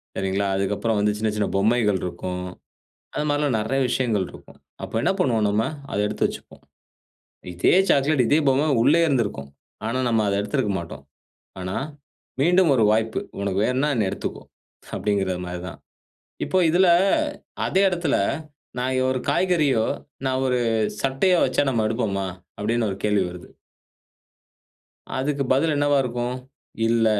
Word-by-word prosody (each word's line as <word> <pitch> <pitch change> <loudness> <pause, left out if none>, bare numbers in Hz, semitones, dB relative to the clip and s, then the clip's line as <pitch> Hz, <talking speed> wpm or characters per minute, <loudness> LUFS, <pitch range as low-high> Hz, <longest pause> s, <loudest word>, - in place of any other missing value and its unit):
சரிங்களா? 95 +1 -1
அதற்கப்பறம் 105 +3 0
வந்து, 105 0 +2
சின்ன 110 +1 0
சின்ன 105 -1 0
பொம்மைகள் 105 -1 +2
இருக்கும். 90 +1 -4 0.7
அத - - -2
மாரில்லாம் 145 -4 +1
நிறைய 135 +6 -1
விஷயங்கள் 115 -6 0
இருக்கும். - - -15 0.2
அப்ப - - -5
என்ன - - +2
பண்ணுவோம் 115 -9 +2
நாம. 105 +2 +1 0.3
அத - - -1
எடுத்து 105 - -1
வைச்சிக்குவோம். - - -10 0.9
இதே 85 - +3 0.2
சாக்லேட், 140 -1 +3
இதே 150 - +4
பொம்மை 140 +4 +2
உள்ளயே 165 +6 +4
இருந்திருக்கும். 105 - -1 0.4
ஆனா 130 +3 -1
நம்ம 115 -2 +2
அத 100 - +1
எடுத்திருக்க 105 +1 -1
மாட்டோம். 85 -1 -9 0.6
ஆனா 90 +1 -4 0.6
"மீண்டும் 175 +4 +4
ஒரு 115 - +3
வாய்ப்பு. 110 +1 +1 0.2
உனக்கு 100 -1 -1
வேணும்னா, 130 +4 +1
என்ன 110 -4 +1
எடுத்துக்கோ" - - -5 0.5
அப்டின்கிறது 95 -3 -1
மாரி 90 0 -5
தான். 85 - -9 0.7
இப்ப, 185 - -2
இதில, 180 +3 +4 0.8
அதே 190 - +2
இடத்துல 175 -5 0 0.6
நான் 130 +1 0
ஒரு 130 -1 -1
காய்கறியோ, 150 -11 +2 0.4
நான் 130 0 0
ஒரு 125 -1 +1 0.4
சட்டையோ 135 +7 +2
வைச்சா - - +1
நம்ம 115 -4 0
எடுப்போமா? 105 -4 -1 0.3
அப்டின்னு 115 +2 0
ஒரு 95 - -4
கேள்வி 105 -2 +2
வருது. 90 0 -10 1.7
அதுக்கு 140 +1 -1
பதில் 150 +3 +2
என்னவா 145 0 +3
இருக்கும்? 120 0 -3 0.5
"இல்ல, 115 -1 +3
115 Hz, 140 wpm, -23 LUFS, 100-135 Hz, 1.7 s, இதே